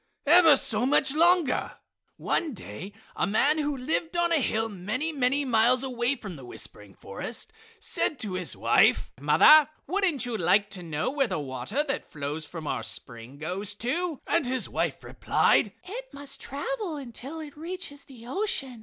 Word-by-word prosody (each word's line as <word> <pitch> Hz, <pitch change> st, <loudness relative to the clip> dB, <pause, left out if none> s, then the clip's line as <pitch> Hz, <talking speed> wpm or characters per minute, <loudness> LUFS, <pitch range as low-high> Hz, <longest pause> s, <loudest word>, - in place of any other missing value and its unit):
Ever 320 Hz, -1 st, +7 dB
so 230 Hz, -1 st, +2 dB
much 270 Hz, -1 st, +3 dB
longer! 340 Hz, -2 st, +3 dB, 0.4 s
One 310 Hz, -7 st, -1 dB
day 175 Hz, -, -8 dB, 0.2 s
a -, -, 0 dB
man 280 Hz, +9 st, +2 dB
who 290 Hz, -2 st, -1 dB
lived 320 Hz, +6 st, -2 dB
on 345 Hz, 0 st, +2 dB
a 325 Hz, -4 st, +3 dB
hill 225 Hz, -2 st, 0 dB
many, 215 Hz, -, -3 dB
many 275 Hz, 0 st, +1 dB
miles 245 Hz, +1 st, +3 dB
away 250 Hz, 0 st, 0 dB
from 195 Hz, -, -8 dB
the 135 Hz, -, -11 dB
whispering 105 Hz, -4 st, -8 dB
forest 100 Hz, -, -6 dB, 0.3 s
said 305 Hz, -, -1 dB
to 205 Hz, -5 st, -3 dB
his 185 Hz, -2 st, -2 dB
wife: -, -, +3 dB
"Mother, 305 Hz, -1 st, +7 dB, 0.2 s
wouldn't 355 Hz, -6 st, +1 dB
you 240 Hz, -2 st, -3 dB
like 195 Hz, +2 st, +2 dB
to 185 Hz, -, -4 dB
know 160 Hz, +7 st, -2 dB
where 275 Hz, -2 st, +1 dB
the 185 Hz, -5 st, -2 dB
water 135 Hz, -, -2 dB
that 285 Hz, -1 st, -4 dB
flows 150 Hz, +1 st, -4 dB
from 165 Hz, -1 st, -8 dB
our -, -, -2 dB
spring 120 Hz, +2 st, -8 dB
goes 185 Hz, +6 st, -3 dB
to?" 310 Hz, -, -2 dB
And 335 Hz, -7 st, +1 dB
his 255 Hz, 0 st, -1 dB
wife -, -, -2 dB
replied: -, -, +2 dB
"It -, -, -8 dB
must 280 Hz, -1 st, -6 dB
travel 385 Hz, -, -4 dB
until 270 Hz, +3 st, -8 dB
it 300 Hz, -2 st, -9 dB
reaches 315 Hz, -3 st, -7 dB
the 240 Hz, -4 st, -14 dB
ocean!" 270 Hz, -, -2 dB
260 Hz, 170 wpm, -27 LUFS, 200-310 Hz, 0.4 s, Ever